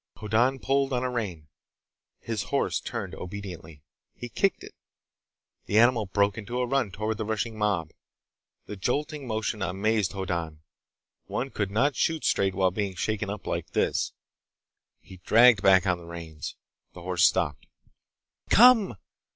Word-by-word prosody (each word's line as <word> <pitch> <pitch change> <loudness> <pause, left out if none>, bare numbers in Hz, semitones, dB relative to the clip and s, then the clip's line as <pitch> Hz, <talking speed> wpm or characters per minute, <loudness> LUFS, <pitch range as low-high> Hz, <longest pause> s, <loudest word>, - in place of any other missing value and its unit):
Hoddan 115 +5 +1
pulled 135 0 0
on 125 0 0
a 125 - -1
rein. 95 -11 -4 0.7
His 110 -4 -3
horse - - 0
turned - - -5
obediently. 90 -6 -8 0.3
He 120 - -8
kicked 195 +10 0
it. - - -11 0.9
The 105 - +1
animal 115 -2 +4
broke 100 +2 +1
into 115 +3 -5
a 125 - +1
run 135 -3 0
toward 110 +3 -3
the - - -1
rushing 110 +1 -2
mob. 100 -7 -1 0.7
The 105 - -7
jolting 145 - -2
motion 110 -1 -2
amazed 100 +2 0
Hoddan. 85 -5 -4 0.6
One 135 +1 -3
could 105 -2 -2
not 130 +8 +1
shoot 160 -2 0
straight 95 -1 +1
while 95 -1 +2
being 100 0 -3
shaken 105 +1 -2
up 105 0 -6
like - - -4
this! - - 0 0.9
He 95 - -13
dragged 115 +3 +5
back 95 0 +5
on 90 -2 +1
the 85 - -12
reins. 85 -3 -8 0.4
The 90 - -11
horse 90 -1 0
stopped. - - +2 0.8
"Come!" 230 - +6
105 Hz, 150 wpm, -27 LUFS, 95-120 Hz, 0.9 s, Come